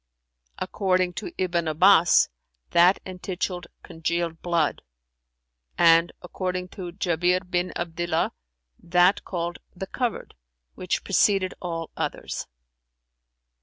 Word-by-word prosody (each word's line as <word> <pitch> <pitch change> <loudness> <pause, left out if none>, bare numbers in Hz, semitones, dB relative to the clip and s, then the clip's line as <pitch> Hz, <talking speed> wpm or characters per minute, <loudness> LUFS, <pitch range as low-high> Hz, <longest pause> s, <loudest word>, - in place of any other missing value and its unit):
"According 185 -2 0
to 360 - -6
Ibn 175 -3 0
Abbas, 170 +2 +5 0.4
that 175 +3 +5
entituled 180 -1 -4 0.2
'Congealed 165 0 -3
Blood':[FN#372] 170 -4 0 0.9
and, 165 0 +5
according 180 0 -3
to 180 -2 -7
Jαbir 180 0 +1
bin 180 0 -1
Abdillah,[FN#373] 170 -1 -1 0.5
that 180 +3 +3
called 175 -1 -4 0.2
'The 190 - -5
Covered' 245 +3 -3 0.4
which 180 - -2
preceded 195 -1 +2
all 165 -2 -4
others. - - -4
180 Hz, 95 wpm, -25 LUFS, 170-185 Hz, 0.9 s, Abbas